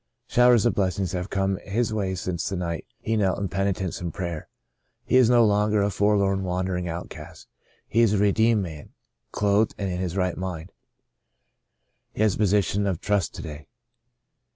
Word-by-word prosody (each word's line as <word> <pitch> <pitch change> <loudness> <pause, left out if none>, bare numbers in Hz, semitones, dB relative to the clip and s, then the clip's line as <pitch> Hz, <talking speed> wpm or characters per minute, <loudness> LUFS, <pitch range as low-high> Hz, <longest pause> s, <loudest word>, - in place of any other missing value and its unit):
Showers 120 -2 +4
of 120 - +3
blessings 95 -3 -1
have 90 +1 -4
come 95 0 0
his 110 +4 -2
way 95 -3 -1
since 90 -1 -3
the 100 - -3
night 85 -2 -4
he 110 - -2
knelt 100 -4 +1
in 100 -2 -3
penitence 95 0 -2
and 85 -2 -3
prayer. 85 -3 -5 0.6
He - - +1
is 130 -3 +6
no 120 -2 +5
longer 105 0 +2
a 100 - 0
forlorn, 100 -1 +2
wandering 90 -1 -2
outcast. 80 -1 -8 0.4
He 115 - +2
is 110 -3 +4
a - - +2
redeemed 105 +2 +3
man 80 -5 -9 0.2
— - - -53
clothed 105 +1 +1
and 100 -2 -2
in 90 - -3
his 90 0 -3
right 90 -2 0
mind. 90 -2 -5 1.4
He 110 - 0
has 105 -3 +3
a - - -7
position 100 0 +2
of 90 -4 -1
trust 100 -4 -1
to - - -6
day. 75 -1 -9
95 Hz, 180 wpm, -25 LUFS, 90-105 Hz, 1.4 s, is